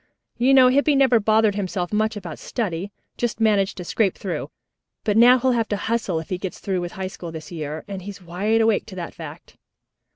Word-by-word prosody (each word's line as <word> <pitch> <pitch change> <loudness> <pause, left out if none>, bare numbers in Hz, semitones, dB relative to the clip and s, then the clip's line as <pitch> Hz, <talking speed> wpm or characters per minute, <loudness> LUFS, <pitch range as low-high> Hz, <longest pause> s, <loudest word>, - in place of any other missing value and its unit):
You 265 +3 +5
know 255 -1 +7
Hippy 285 +3 +3
never 260 -4 +5
bothered 215 0 +3
himself 190 -2 -3
much 215 +1 +1
about 175 -6 -7
study, 200 -4 -3 0.3
just 240 -2 -2
managed 205 -4 +2
to 180 - -5
scrape 195 +2 0
through. 190 -3 -4 0.5
But 210 -2 +1
now 245 +3 +7
he'll 260 +1 +2
have 230 -2 +1
to 205 - 0
hustle 210 -5 -1
if 160 - -9
he 185 - -2
gets 190 -1 -5
through 190 -2 -2
with 175 0 -5
High 190 - -4
School 180 -2 -7
this 160 0 -9
year, 155 -2 -5
and 195 -2 -6
he's 200 +1 -8
wide 195 +6 0
awake 220 -1 +2
to 195 - -9
that 175 -2 -6
fact." - - -11
205 Hz, 215 wpm, -23 LUFS, 180-225 Hz, 0.5 s, know